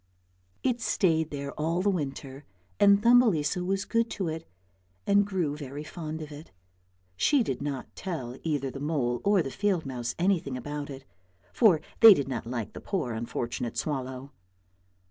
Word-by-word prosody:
It 245 -2 0
stayed 160 -7 +1
there 140 -1 -5
all 165 +4 0
the 205 - +3
winter, 140 -4 -4 0.4
and 200 0 +6
Thumbelisa 200 -9 +4
was 195 +2 -1
good 230 0 +1
to 185 -5 -1
it 160 +1 -6 0.6
and 200 0 +4
grew 175 -7 -1
very 145 0 -7
fond 155 0 -6
of 150 - -10
it. 150 +2 -10 0.7
She 280 - +3
did 135 - -3
not 140 -3 -5
tell 140 -10 -5
either 145 -4 -1
the 135 - -7
mole 135 -5 -1
or 200 -3 +3
the 135 - -5
field 195 -3 0
mouse 120 -2 -4
anything 170 -8 +1
about 145 +3 -5
it, 135 -1 -9 0.5
for 190 -10 +5 0.2
they 225 -3 +10
did 140 - -2
not 120 -4 -4
like 120 -3 -4
the - - -8
poor 155 - -2
unfortunate 120 +1 -4
swallow. 130 -2 -3
155 Hz, 165 wpm, -28 LUFS, 135-190 Hz, 0.7 s, they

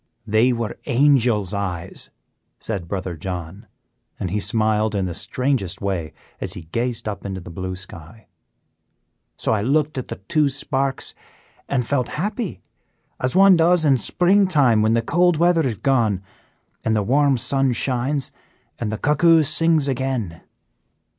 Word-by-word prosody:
"They 110 +4 +3
were 115 -2 -3
angel's 120 -7 +3
eyes," 90 -3 -4 0.5
said 95 -6 -4
Brother 95 -2 -4
John; 90 +2 -7 0.5
and 90 - -3
he 105 - 0
smiled 110 -1 +1
in 95 -2 0
the 90 - -4
strangest 125 -2 -2
way, 95 -6 -3 0.3
as - - -4
he 85 - -8
gazed 115 +8 -3
up 105 - -5
into 95 -1 -5
the 85 - -10
blue 95 +2 -5
sky. 95 +3 -11 1.1
"So - - -1
I 110 -2 +1
looked 145 +4 +1
at 125 - -6
the - - -5
two 145 +10 0
sparks 135 0 -2 0.6
and 125 -3 0
felt 125 -1 0
happy, 200 - -3 0.6
as 130 +5 -1
one 195 0 +7
does 170 0 +3
in 135 -3 +4
spring 190 - +3
time 135 -11 +3
when 110 +1 +3
the 115 - +1
cold 175 +5 +2
weather 170 0 +3
is 125 -5 -1
gone, 110 -7 +1 0.6
and 110 - +1
the 105 - +1
warm 140 +4 +3
sun 135 +2 +1
shines, 130 +3 -1 0.5
and 110 -3 -2
the 110 - -3
cuckoo 160 +4 +4
sings 155 0 +3
again. 130 -10 -2
120 Hz, 155 wpm, -21 LUFS, 100-145 Hz, 1.1 s, one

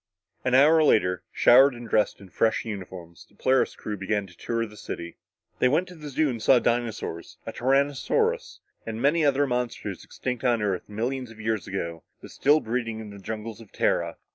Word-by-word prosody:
An 130 0 +2
hour 155 +4 +6
later, 90 - +3
showered 130 +2 +6
and 120 0 -9
dressed 110 -1 +1
in 100 -2 -13
fresh 110 +5 +1
uniforms, 90 -5 -8
the - - -26
Polaris 130 0 +2
crew 105 - -5
began 100 +1 -1
a 95 -2 -14
tour 115 +6 -2
of 110 - -7
the - - -13
city. 85 -4 -7 0.4
They - - +4
went 160 +8 +2
to 180 - -11
the 150 -2 -8
zoo 150 +3 +1
and 120 -5 -3
saw 130 - +5
dinosaurs, 115 -8 -2
a - - -5
tyrannosaurus, 135 +2 0 0.2
and 115 0 -5
many 150 +6 +3
other 145 0 +3
monsters 125 -2 -3
extinct 125 -1 -5
on 120 -2 +2
Earth 100 -3 -2
millions 125 +4 -3
of 115 -1 -14
years 110 -4 -2
ago, 85 -4 -4 0.2
but - - -12
still 150 +2 +3
breeding 115 -1 -3
in 110 -2 -8
the 100 - -10
jungles 110 +2 -6
of 110 - -15
Tara. - - 0
115 Hz, 195 wpm, -26 LUFS, 105-130 Hz, 0.4 s, hour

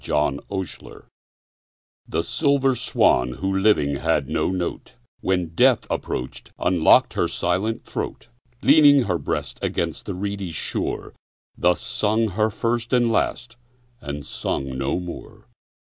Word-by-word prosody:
6 - - -9
Autoplay 75 +6 -3 1.0
The 85 - -1
silver 140 - +2
swan, 65 - +2
who 95 +9 -2
living 85 -9 +2
had 75 -3 0
no - - 0
note, 90 -2 -4 0.2
When 90 -3 -1
death - - +4
approach'd, 65 - -4
unlock'd 90 -3 +4
her - - +1
silent 95 +6 -1
throat; - - -5 0.4
Leaning 145 -1 +7
her 90 -6 -1
breast - - -4
against - - -2
the - - -3
reedy 100 0 -4
shore, 80 - -3 0.4
Thus 90 0 +2
sung 110 +1 0
her 110 +3 +1
first 115 +2 -2
and 120 -2 +3
last, 120 +1 -1 0.4
and 70 -4 -6
sung 70 -1 -3
no 70 +6 -1
more. 90 -1 -9
95 Hz, 130 wpm, -23 LUFS, 80-115 Hz, 1.0 s, Leaning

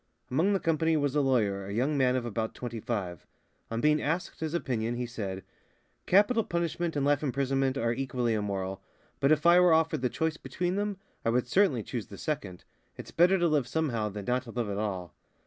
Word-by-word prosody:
Among 165 +10 +2
the 195 - +2
company 160 -1 +1
was 145 -2 0
a 150 - +3
lawyer, 105 -8 +1
a - - -5
young 130 +7 +1
man 130 -2 +3
of 125 -2 -1
about 110 -1 -3
twenty 120 -2 -5
five. 100 - -4 0.4
On 115 - -2
being 150 0 +3
asked 165 +5 -2
his 160 +1 -2
opinion, 120 -7 -1
he 125 0 -2
said: 100 -6 -5 0.6
"Capital 210 +5 +4
punishment 170 -2 -2
and 140 -1 0
life 145 -1 +3
imprisonment 135 -1 0
are 115 -3 +1
equally 125 -2 -1
immoral; 95 -3 -3 0.4
but 140 - +3
if 150 0 +2
I 175 +1 +7
were 180 -2 +6
offered 160 -4 +2
the 125 - +1
choice 160 +3 -1
between 180 +2 -2
them, 205 -1 -1 0.3
I - - +1
would 125 +1 +1
certainly 145 - +3
choose 120 -2 -5
the 100 - -10
second. 100 - -4 0.3
It's - - -9
better 180 +3 +4
to 175 -1 +2
live 150 -6 +1
somehow 120 -7 -1
than 100 -1 -7
not 125 +3 +1
to - - -10
live 115 -2 -3
at 100 - -2
all." 95 -5 -3
130 Hz, 210 wpm, -29 LUFS, 115-160 Hz, 0.6 s, I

